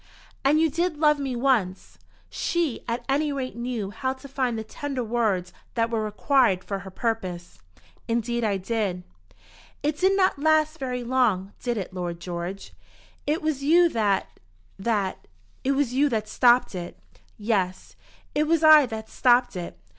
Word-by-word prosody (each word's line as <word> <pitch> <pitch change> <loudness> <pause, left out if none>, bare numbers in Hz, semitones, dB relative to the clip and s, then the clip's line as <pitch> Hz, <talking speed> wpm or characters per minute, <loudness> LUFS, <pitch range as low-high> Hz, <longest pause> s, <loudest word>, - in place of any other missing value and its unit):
"And 290 +3 +4
you 325 - +4
did 335 +1 -1
love 300 -1 +3
me 270 -3 -2
once?" 235 -8 0 0.3
She 335 -7 -2
at 235 +1 -3
any 290 +2 +1
rate 265 -2 -4
knew 235 -4 -3
how 260 +4 -2
to 265 +1 -12
find 255 -3 -1
the 220 - -4
tender 265 +3 -4
words 215 -6 -1 0.2
that 230 -1 +1
were 225 -1 0
required 215 -2 +2
for 195 -1 -4
her 195 0 -9
purpose. 185 - -4 0.5
"Indeed 235 +1 -1
I 205 -3 +1
did." 195 -2 -2 0.8
"It 300 0 -1
did 385 +1 +3
not 375 -6 +2
last 310 +1 +2
very 250 -2 -3
long; 235 -6 +1
did 240 -2 -1
it, 195 -2 -5
Lord 175 -2 -4
George?" 175 +2 -6 0.5
"It 310 +2 0
was 305 -3 -1
you 340 +4 +5
that 210 -7 -1 0.4
that. 200 -2 -1 0.4
It 275 - +2
was 270 -3 0
you 285 +3 +3
that 215 -3 -1
stopped 240 +2 +4
it." 175 -1 -6 0.4
"Yes, 200 -4 -2 0.4
it 300 +1 +1
was 325 0 +2
I 310 -3 +8
that 220 -1 -6
stopped 245 -2 +3
it. 175 -1 -6
240 Hz, 160 wpm, -25 LUFS, 205-280 Hz, 0.8 s, I